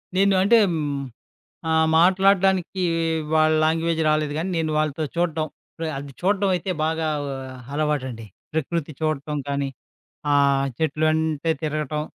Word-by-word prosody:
నేను 195 +1 +4
అంటే 230 +5 +5
హ్మ్, 150 -3 -2 0.7
ఆహ్, 160 0 +3
మాట్లాడడానికి 190 0 +3 0.5
వాళ్ళ 155 0 +4
లాంగ్వేజ్ 165 +1 +1
రాలేదు 155 -1 +1
గానీ 180 +4 -2
నేను 160 -1 -1
వాళ్ళతో 155 0 0
చూడటం, 165 -2 0 0.3
ప్ర 165 - -4
అది 140 0 -8
చూడడం 195 +1 +2
అయితే 180 +2 -2
బాగా 160 0 0 0.7
అలవాటండి. 130 -7 -2 0.3
ప్రకృతి 160 0 -2
చూడటం 150 -1 -1
కానీ, 140 -1 -1 0.6
ఆ - - +4 0.4
చెట్లు 155 0 0
అంటే 160 0 -1
తిరగటం, 150 0 -2
160 Hz, 125 wpm, -23 LUFS, 150-175 Hz, 0.7 s, అంటే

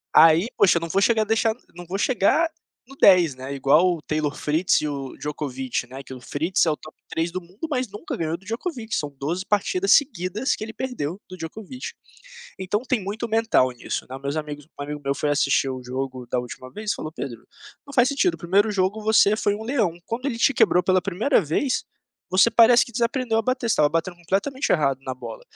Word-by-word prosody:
Aí 165 +5 +7
poxa 180 - +5
eu - - -1
não 165 - -4
vou 195 +4 +1
chegar 225 +1 +3
a - - -6
deixar 225 +1 +2 0.2
não 175 0 -9
vou 180 +3 -4
chegar 260 - +2 0.4
no 270 - -13
10, 175 - +6
né, 130 +2 -6
igual 140 +5 +4
o - - -13
Taylor 155 -1 -2
Fritz 160 +5 +1
e 150 - -2
o 140 -2 -5
Djokovich, 135 -4 -4
né, 130 +2 -8
que 135 - -14
o 130 - -7
Fritz 160 +10 0
é 160 - +2
o - - -1
top 155 - -14
3 165 +1 -2
do 185 - -3
mundo, 185 - -8
mas 255 -4 -1
nunca 205 +1 -6
ganhou 165 0 -1
do 175 - -13
Djokovich, 230 -1 -4
são 145 -2 -4
12 170 +7 -2
partidas 365 - +1
seguidas 215 - +1
que - - -7
ele 220 +1 -7
perdeu 205 - -4
do 185 - -9
Djokovich. 215 +10 -7 0.7
Então 190 +4 -1
tem 240 -3 0
muito 205 +5 -4
mental 225 - +2
nisso, 120 -1 -5
né, 130 - -6
meus 140 +2 -3
amigos 150 -2 -5
um - - -4
amigo 150 +1 -5
meu 140 0 0
foi 145 - -1
assistir 140 -2 +2
o 130 -1 -5
jogo 130 0 -5
da 125 - -1
última 125 +1 -7
vez 210 +4 -3
falou: 155 - -5
"Pedro, 125 -7 -7 0.4
não 280 - -10
faz 250 -1 +5
sentido 290 +5 +1
o - - -9
primeiro 200 +5 +2
jogo 200 +1 0
você 215 -1 +5
foi 205 -2 +1
um 210 - -6
leão, 220 -9 0
quando 245 +4 -4
ele 260 -5 -1
te 275 - +4
quebrou 180 -8 +4
pela 185 0 +3
priemira 195 +9 +1
vez, 200 - -1 0.5
você 190 +5 +5
parece 235 +1 +6
que 240 - -13
desaprendeu 235 0 0
a - - +1
bater, 255 0 -1
você - - +3
estava 150 - +4
batendo 165 +3 -2
completamente 200 +11 -1
errado 140 -5 +2
na 130 -1 -4
bola, - - -9
185 Hz, 225 wpm, -23 LUFS, 150-225 Hz, 0.7 s, Aí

